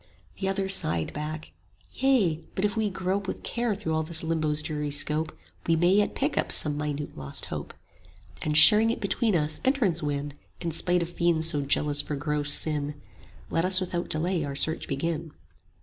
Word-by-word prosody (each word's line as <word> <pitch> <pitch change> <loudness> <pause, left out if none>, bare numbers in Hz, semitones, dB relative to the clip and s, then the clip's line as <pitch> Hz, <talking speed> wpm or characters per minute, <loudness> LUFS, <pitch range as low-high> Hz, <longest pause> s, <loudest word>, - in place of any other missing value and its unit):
The 190 - -1
other 195 0 -1
sighed 85 - +3
back, 155 +1 -6 0.4
Yea; 210 -13 +1
but 190 - 0
if 205 - -1
we 220 -2 0
grope 190 +1 -2
With - - -5
care 235 -3 -1
through 195 -5 -3
all 160 - +1
this 160 +1 +1
Limbo's 155 -2 0
dreary 150 -1 -3
scope, 150 +2 -1 0.4
We 165 - +3
yet - - -1
may 190 +4 +4
pick 280 +3 -2
up - - -2
some 150 -1 +3
minute 150 0 -4
lost 70 -1 -6
hope; - - -6 0.6
60 - - -6
And 150 0 +2
sharing 210 +8 +7
it 230 - -1
between 205 +1 0
us, 150 -1 -1
entrance 235 - +1
win, 145 -1 -3 0.3
In 170 - -3
spite 175 +2 +1
of 170 - -6
fiends 170 -2 +1
so 150 -4 0
jealous 145 +1 0
for 150 - -5
gross 145 0 -1
sin: 145 -1 +3 0.5
Let 165 - +1
us 185 +1 +5
without 175 -2 -3
delay 170 +2 0
our 140 -1 -5
search 160 +3 +2
begin. 160 +2 -3
160 Hz, 190 wpm, -26 LUFS, 150-190 Hz, 0.6 s, sharing